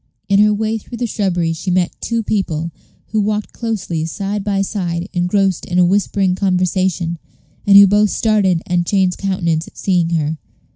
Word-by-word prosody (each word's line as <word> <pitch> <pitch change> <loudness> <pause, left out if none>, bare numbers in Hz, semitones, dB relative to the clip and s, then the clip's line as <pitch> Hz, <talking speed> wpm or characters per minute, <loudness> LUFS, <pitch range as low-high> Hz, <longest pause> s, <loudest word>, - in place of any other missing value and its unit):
In 200 0 +3
her 210 0 +5
way 220 +1 -1
through 235 +3 -9
the 245 - -1
shrubbery 180 -7 -1
she 170 +4 -5
met 180 -1 +1
two 230 -1 -1
people, 170 -6 -2 0.4
who 215 - 0
walked 210 0 -2
closely 195 -8 -3
side 200 +4 -3
by 195 -1 0
side, 180 -4 -3
engrossed 185 +1 +1
in 175 - -2
a 180 - +5
whispering 195 0 +1
conversation, 185 -2 0 0.5
and 200 0 +8
who 200 - +10
both 205 +2 +3
started 195 -7 +1
and 175 -1 +1
changed 190 -3 +1
countenance 170 -5 -1
at - - -16
seeing 180 -4 +1
her. 160 -2 -1
190 Hz, 175 wpm, -17 LUFS, 175-205 Hz, 0.5 s, who